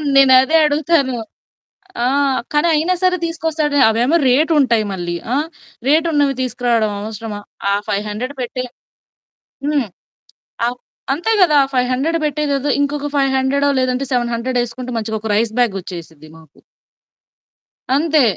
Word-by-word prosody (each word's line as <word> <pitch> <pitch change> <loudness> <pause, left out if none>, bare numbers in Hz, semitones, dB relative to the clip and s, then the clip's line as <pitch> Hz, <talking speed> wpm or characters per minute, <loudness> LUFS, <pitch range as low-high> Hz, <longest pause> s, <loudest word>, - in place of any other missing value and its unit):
నేనదే 265 +3 +6
అడుగుతాను. 290 -3 +1 0.9
ఆ! - - +2 0.5
కానీ 295 +3 +3
అయినా 325 +4 +1
సరే 365 0 +3
తీసుకొస్తాడు. 320 -3 -1
అవేమో 245 +9 +2
రేట్ 300 +6 +3
ఉంటాయి. 230 -5 +3
మళ్ళీ 175 -2 -4 0.2
ఆ! - - +2 0.5
రేట్ 315 +3 +3
ఉన్నవి 285 -3 +2
తీసుకురావడం 235 -3 0
అవసరమా? 215 0 -6 0.3
ఆ - - +3
500 210 +7 -3
పెట్టే 250 +1 -4 1.0
హ్మ్. 290 -5 +1 0.8
అ - - +2 0.5
అంతే 350 +10 -1
గదా! 305 -5 +5 0.2
500 255 +6 +1
పెట్టేదేదో 290 -1 -1
ఇంకొక 290 0 -2
5 275 -1 +2
హండ్రెడో 280 +2 +1
లేదంటే 255 +1 0
700 240 +1 -1
ఎసుకుంటే 250 +1 -8
మంచిగా 220 0 -3
ఒక 220 - -5
రైస్ 220 0 0
బ్యాగ్ 235 -5 +2
వచ్చేసిద్దిమాకు. 160 -3 -12 1.4
అంతే. 310 -1 +3
260 Hz, 120 wpm, -18 LUFS, 230-295 Hz, 1.4 s, నేనదే